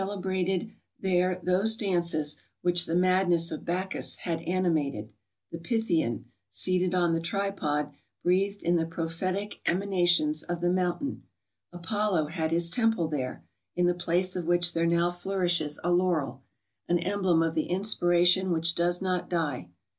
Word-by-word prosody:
169 190 Hz, -1 st, -1 dB
brated 220 Hz, +4 st, -9 dB, 0.3 s
there 185 Hz, -1 st, +1 dB
those 195 Hz, +5 st, +3 dB
dances 170 Hz, -7 st, 0 dB, 0.3 s
which 175 Hz, -1 st, +2 dB
the 165 Hz, -, -1 dB
madness 180 Hz, -2 st, +2 dB
of 155 Hz, -, -5 dB
Bacchus 185 Hz, +3 st, -1 dB
had 165 Hz, -2 st, -3 dB
animated, 160 Hz, -, -1 dB, 0.4 s
the 165 Hz, -, -6 dB
Pythian, 170 Hz, -, 0 dB, 0.2 s
seated 185 Hz, -, 0 dB
on 175 Hz, -2 st, +2 dB
the 165 Hz, -, +1 dB
tripod, 165 Hz, -5 st, -2 dB, 0.3 s
breathed 195 Hz, +3 st, +1 dB
in 175 Hz, +1 st, +2 dB
tlie 165 Hz, 0 st, -1 dB
prophetic 180 Hz, +5 st, -3 dB
emanations 175 Hz, -5 st, +2 dB
of 175 Hz, -1 st, -4 dB
the 175 Hz, 0 st, +1 dB
mountain, 185 Hz, +10 st, -1 dB, 0.5 s
Apollo 175 Hz, -2 st, -1 dB
had 160 Hz, -1 st, -2 dB
his 170 Hz, +1 st, +1 dB
temple 225 Hz, -8 st, +1 dB
there, 130 Hz, -, -4 dB, 0.3 s
in 180 Hz, -, +2 dB
the 175 Hz, -, +3 dB
place 175 Hz, +1 st, 0 dB
of 180 Hz, -2 st, -3 dB
which 175 Hz, 0 st, +2 dB
there 165 Hz, 0 st, +1 dB
now 170 Hz, +1 st, +2 dB
flourishes 175 Hz, -4 st, -1 dB
a 175 Hz, -, +1 dB
laurel, 175 Hz, -7 st, +1 dB, 0.5 s
an 175 Hz, -, +3 dB
emblem 185 Hz, -3 st, +1 dB
of 165 Hz, -1 st, 0 dB
the 155 Hz, -, -1 dB
inspiration 180 Hz, -1 st, +3 dB
which 165 Hz, 0 st, +2 dB
does 175 Hz, +2 st, 0 dB
not 185 Hz, -1 st, -1 dB
die. 150 Hz, -, -2 dB
175 Hz, 150 wpm, -28 LUFS, 165-185 Hz, 0.5 s, those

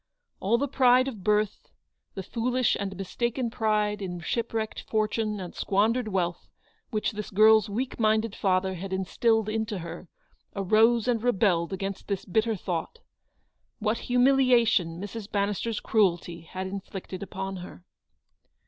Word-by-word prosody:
All 215 Hz, +5 st, +2 dB
the 285 Hz, +4 st, 0 dB
pride 255 Hz, -1 st, +4 dB
of 220 Hz, -8 st, -6 dB
birth, 210 Hz, -1 st, 0 dB, 0.5 s
the 190 Hz, -, -4 dB
foolish 245 Hz, +4 st, 0 dB
and 195 Hz, -2 st, -4 dB
mistaken 235 Hz, +5 st, -2 dB
pride 210 Hz, -2 st, 0 dB
in 180 Hz, -2 st, -4 dB
shipwrecked 225 Hz, +4 st, -2 dB
fortune 215 Hz, -1 st, -1 dB
and 180 Hz, -2 st, -7 dB
squandered 220 Hz, +4 st, +1 dB
wealth 180 Hz, -4 st, -2 dB, 0.4 s
which 215 Hz, -3 st, -1 dB
this 210 Hz, 0 st, -6 dB
girl's 215 Hz, +1 st, +5 dB
weak 245 Hz, +6 st, -3 dB
minded 220 Hz, -1 st, +2 dB
father 190 Hz, -1 st, +1 dB
had 190 Hz, +2 st, -6 dB
instilled 220 Hz, +4 st, +1 dB
into 220 Hz, -1 st, -2 dB
her, 170 Hz, +1 st, -8 dB, 0.5 s
arose 220 Hz, +4 st, +3 dB
and 235 Hz, -3 st, +1 dB
rebelled 195 Hz, -8 st, +2 dB
against 195 Hz, 0 st, -4 dB
this 200 Hz, -2 st, -3 dB
bitter 220 Hz, +4 st, +1 dB
thought. 180 Hz, -, -4 dB, 0.8 s
What 220 Hz, +1 st, -1 dB
humiliation 245 Hz, -9 st, +3 dB
Mrs. 205 Hz, +2 st, -7 dB
Bannis 200 Hz, -1 st, 0 dB
ter's 230 Hz, -2 st, -2 dB
cruelty 175 Hz, -5 st, +1 dB
had 190 Hz, 0 st, -4 dB
inflicted 190 Hz, -1 st, -6 dB
upon 190 Hz, 0 st, -5 dB
her 180 Hz, 0 st, -10 dB
210 Hz, 140 wpm, -27 LUFS, 190-230 Hz, 0.8 s, girl's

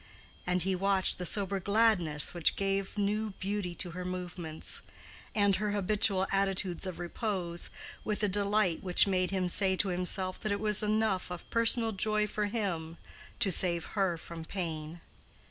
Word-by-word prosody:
And 180 Hz, 0 st, +1 dB
he 190 Hz, +1 st, 0 dB
watched 190 Hz, 0 st, +1 dB
the 180 Hz, -, -2 dB
sober 195 Hz, 0 st, +1 dB
gladness 190 Hz, -7 st, +2 dB
which 170 Hz, -3 st, +2 dB
gave 195 Hz, +1 st, -2 dB
new 210 Hz, +1 st, -1 dB
beauty 195 Hz, -3 st, -3 dB
to 175 Hz, +1 st, -1 dB
her 180 Hz, +2 st, -6 dB
movements; 180 Hz, -3 st, -4 dB, 0.5 s
and 200 Hz, -2 st, +3 dB
her 210 Hz, +1 st, -2 dB
habitual 200 Hz, -1 st, +2 dB
attitudes 195 Hz, -2 st, +1 dB
of 185 Hz, -, -5 dB
repose, 175 Hz, -1 st, -2 dB, 0.3 s
with 210 Hz, 0 st, -2 dB
a -, -, +4 dB
delight 200 Hz, -2 st, +1 dB
which 180 Hz, -2 st, +5 dB
made 185 Hz, -2 st, +1 dB
him 190 Hz, -2 st, -1 dB
say 190 Hz, +1 st, +3 dB
to 195 Hz, +1 st, +2 dB
himself 185 Hz, +1 st, 0 dB
that 215 Hz, -, -3 dB
it 200 Hz, -, -1 dB
was 210 Hz, -1 st, +4 dB
enough 215 Hz, -3 st, 0 dB
of 180 Hz, -1 st, -8 dB
personal 230 Hz, 0 st, +3 dB
joy 215 Hz, +1 st, +1 dB
for 210 Hz, 0 st, -2 dB
him 170 Hz, -7 st, -3 dB, 0.4 s
to 195 Hz, -, +3 dB
save 170 Hz, -2 st, +4 dB
her 190 Hz, -5 st, 0 dB
from 165 Hz, 0 st, -9 dB
pain. 160 Hz, -2 st, -5 dB
190 Hz, 160 wpm, -30 LUFS, 180-205 Hz, 0.5 s, which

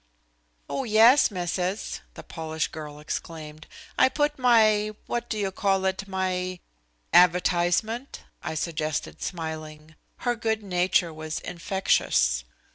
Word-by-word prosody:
"Oh, 270 Hz, -, -2 dB
yes, 230 Hz, +4 st, +6 dB
Misses," 180 Hz, +1 st, -3 dB
the -, -, -9 dB
Polish 160 Hz, -1 st, -3 dB
girl 150 Hz, -2 st, -8 dB
exclaimed. 155 Hz, 0 st, -6 dB, 0.3 s
"I 260 Hz, -, +6 dB
put 295 Hz, 0 st, 0 dB
my 215 Hz, -4 st, +4 dB
what 240 Hz, 0 st, -3 dB
do 215 Hz, -, -2 dB
you 200 Hz, -2 st, -1 dB
call 195 Hz, 0 st, +1 dB
it? 190 Hz, +1 st, -1 dB
My 185 Hz, -1 st, -2 dB, 0.3 s
" -, -, -43 dB, 0.3 s
"Advertisement," 180 Hz, +7 st, +3 dB, 0.2 s
I -, -, -4 dB
suggested, 155 Hz, -, -3 dB
smiling. 155 Hz, -2 st, -6 dB, 0.3 s
Her 245 Hz, 0 st, +2 dB
good 220 Hz, -2 st, -1 dB
nature 180 Hz, -2 st, +1 dB
was 155 Hz, 0 st, -5 dB
infectious. 170 Hz, -, +1 dB
180 Hz, 120 wpm, -26 LUFS, 160-215 Hz, 0.3 s, yes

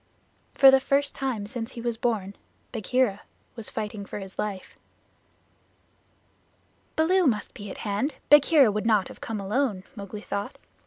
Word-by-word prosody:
For 270 Hz, -1 st, +8 dB
the 265 Hz, -, +6 dB
first 280 Hz, +1 st, +1 dB
time 255 Hz, -7 st, -3 dB
since 230 Hz, +3 st, -6 dB
he -, -, -8 dB
was 235 Hz, 0 st, -2 dB
born, 220 Hz, -4 st, -2 dB, 0.4 s
Bagheera 230 Hz, -1 st, 0 dB, 0.3 s
was 230 Hz, -3 st, -6 dB
fighting 210 Hz, -1 st, -4 dB
for -, -, -7 dB
his 195 Hz, -2 st, -9 dB
life. 200 Hz, -3 st, -4 dB, 2.2 s
"Baloo 350 Hz, +2 st, +3 dB
must 215 Hz, -5 st, -1 dB
be 205 Hz, 0 st, -8 dB
at -, -, -7 dB
hand; 215 Hz, +8 st, -1 dB
Bagheera 295 Hz, -4 st, +6 dB
would 210 Hz, +2 st, -2 dB
not 210 Hz, -4 st, +3 dB
have -, -, -13 dB
come 225 Hz, -2 st, -4 dB
alone," 205 Hz, 0 st, -1 dB
Mowgli 205 Hz, 0 st, -7 dB
thought. 200 Hz, -1 st, -4 dB
225 Hz, 150 wpm, -26 LUFS, 205-265 Hz, 2.2 s, For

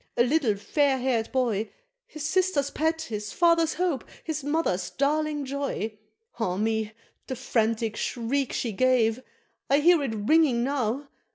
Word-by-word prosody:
a 240 Hz, -, +5 dB
little 255 Hz, -4 st, +2 dB
fair 275 Hz, +6 st, +1 dB
haired 245 Hz, -3 st, -1 dB
boy, 230 Hz, -5 st, 0 dB, 0.4 s
His 310 Hz, -1 st, -7 dB
sister's 310 Hz, -4 st, +1 dB
pet, 320 Hz, +1 st, 0 dB
his 210 Hz, -7 st, -5 dB
father's 335 Hz, -2 st, +3 dB
hope, 350 Hz, -6 st, 0 dB, 0.2 s
his 310 Hz, -3 st, -3 dB
mother's 290 Hz, -, 0 dB
darling 295 Hz, +1 st, 0 dB
joy! 260 Hz, -6 st, -3 dB, 0.4 s
Ah 185 Hz, -5 st, -1 dB
me! 220 Hz, 0 st, -1 dB, 0.3 s
the 260 Hz, -, -3 dB
frantic 225 Hz, -3 st, 0 dB
shriek 250 Hz, +4 st, -1 dB
she 235 Hz, -, -2 dB
gave! 245 Hz, +1 st, +2 dB, 0.5 s
I 280 Hz, -, +5 dB
hear 335 Hz, +2 st, +5 dB
it 250 Hz, -6 st, -2 dB
ringing 245 Hz, +2 st, +3 dB
now! 270 Hz, 0 st, -1 dB
265 Hz, 145 wpm, -26 LUFS, 225-300 Hz, 0.5 s, a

